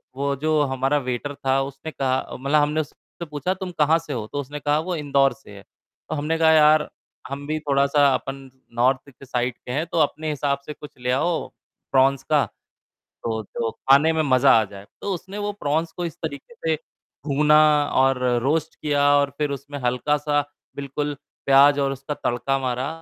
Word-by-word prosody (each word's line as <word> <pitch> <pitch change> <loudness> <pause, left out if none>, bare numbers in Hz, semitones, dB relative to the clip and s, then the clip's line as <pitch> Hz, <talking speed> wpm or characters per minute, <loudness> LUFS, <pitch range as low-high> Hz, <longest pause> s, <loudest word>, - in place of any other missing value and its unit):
वो 140 0 -1
जो 155 -1 +2
हमारा 135 +1 0
वेटर 130 +2 -3
था 135 0 +1
उसने 135 +3 -7
कहा 130 -2 -2
मतलब 145 +3 +2
हमने 150 +2 +1
उससे 170 +3 -11
पूछा 150 +5 -2
"तुम 185 -1 -6
कहाँ 155 +2 +5
से 150 -3 -7
हो?" 110 -4 -3
तो 145 - -5
उसने 145 +2 -7
कहा 145 +1 +1
"वो 175 +2 -3
इंदौर 140 -2 +2
से 135 -6 -17
है," 100 - -11 0.5
तो 155 - -2
हमने 155 +3 -1
कहा 160 -1 +5
"यार 155 -1 +5 0.4
हम 140 +1 -6
भी 155 0 -1
थोड़ा-सा 140 0 +2
अपन 135 +1 -3 0.4
नार्थ 130 +3 +1
की 135 +1 -15
साइड 125 -1 -1
के 125 - -9
हैं, 150 +5 -1
तो 165 - -1
अपने 155 +1 0
हिसाब 140 -1 -1
से 150 - -6
कुछ 150 -3 -13
ले 125 0 -1
आओ 160 +5 0 0.4
प्रॉन्स 135 0 +3
का 150 -2 +2 0.8
तो 110 -1 -2
तो 115 +2 -3
खाने 145 +4 +4
में 160 - +1
मज़ा 135 -1 +4
आ - - +2
जाए," 100 0 -12 0.2
तो 200 - -2
उसने 190 +3 -7
वो 205 0 -2
प्रॉन्स 160 -2 -1
को 175 - -4
इस 165 - -5
तरीके 150 - -6
से 160 -6 -1 0.5
भूना 150 +2 +4 0.4
और 135 -1 +2 0.2
रोस्ट 160 +3 0
किया 145 -2 0
और 140 -1 +2
फ़िर 150 -2 -1
उसमें 140 +1 -6
हल्का-सा 145 +4 +1 0.3
बिल्कुल 145 +1 -3 0.3
प्याज़ 140 +1 +6
और 135 -1 +1
उसका 135 +2 -5
तड़का 135 +1 -1
मारा 130 +1 -2
145 Hz, 190 wpm, -23 LUFS, 135-155 Hz, 0.8 s, प्याज़